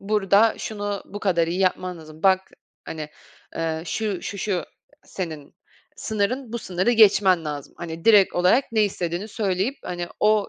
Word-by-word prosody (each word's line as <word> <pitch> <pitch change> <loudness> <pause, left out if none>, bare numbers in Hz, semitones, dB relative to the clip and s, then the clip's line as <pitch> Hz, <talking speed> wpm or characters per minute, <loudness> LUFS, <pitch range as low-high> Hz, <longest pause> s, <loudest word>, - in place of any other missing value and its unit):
burada 205 +1 +3
şunu 205 -2 -4
bu 205 - -8
kadar 175 -5 +2
iyi 175 +3 -2
yapman 185 -1 0
lazım. 155 0 -13
"Bak, 190 -1 +5 0.4
hani, 155 -2 -6 0.5
eee, 160 -1 -2
şu, 210 -3 -2
şu, 200 - -5
şu, 185 -2 -1 0.4
senin 160 -6 -7 0.4
sınırın, 220 +4 -2
bu 235 - -2
sınırı 185 +1 0
geçmen 195 -6 +5
lazım." 145 -2 -6
Hani, 165 -1 -7
direkt 205 -4 +6
olarak 185 +10 +4
ne 220 -1 +3
istediğini 180 0 -3
söyleyip, 205 +3 -1
hani, 175 -1 -4
o 210 -1 +3
190 Hz, 155 wpm, -23 LUFS, 170-210 Hz, 0.5 s, direkt